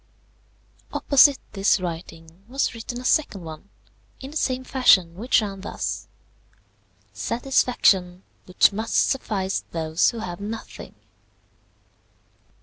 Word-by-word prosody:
Opposite 280 0 +5
this 195 +1 +2
writing 165 0 -8
was 270 +1 -1
written 235 +1 -6
a 250 - -9
second 210 - +1
one, 160 +4 -10 0.5
in 270 +1 -9
the - - -12
same 260 -4 -1
fashion, 210 -11 +4
which 225 +4 +1
ran 195 -2 -6
thus: 200 - -4 1.1
"SATISFACTION 200 -7 +1 0.2
WHICH 180 +2 +4
MUST 220 +3 -3
SUFFICE 195 -7 0
THOSE 160 0 +1
WHO 235 - -6
HAVE 175 -4 -6
NOTHING. 220 +2 -8
200 Hz, 110 wpm, -23 LUFS, 180-250 Hz, 1.1 s, Opposite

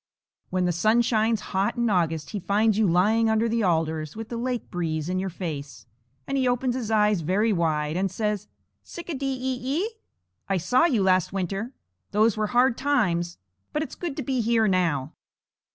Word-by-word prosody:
When 185 0 0
the 180 - +2
sun 215 +8 +3
shines 225 -1 +1
hot 190 +1 +1
in 235 0 +1
August, 165 -6 0
he 210 - -3
finds 205 +3 +2
you 215 -1 +3
lying 215 +6 +3
under 220 +1 +2
the 230 0 0
alders, 160 -4 0
with 225 0 -7
the 235 - -4
lake 245 0 -3
breeze 160 -3 -2
in 185 0 0
your 190 +1 -2
face, 150 -7 -6 0.4
and 275 - -1
he 260 - +2
opens 245 0 +1
his 240 -4 -3
eyes 210 -4 +3
very 205 +7 +1
wide 155 -3 0
and 190 +2 0
says: 210 +1 -2 0.4
"Tsic 345 0 -9
a - - -1
dee 275 -1 -3
e 255 0 -2 0.2
e? 435 - -2 0.6
I 195 - +2
saw 250 - +3
you 240 - +2
last 185 -2 +3
winter. 195 +6 -3 0.4
Those 215 +1 +3
were 215 -1 0
hard 245 +1 +3
times. 180 -12 +1 0.4
But 300 - 0
it's - - -8
good 335 -6 -5
to 290 - -2
be 255 0 0
here 225 -1 +2
now." 165 -7 0
210 Hz, 195 wpm, -25 LUFS, 175-235 Hz, 0.6 s, sun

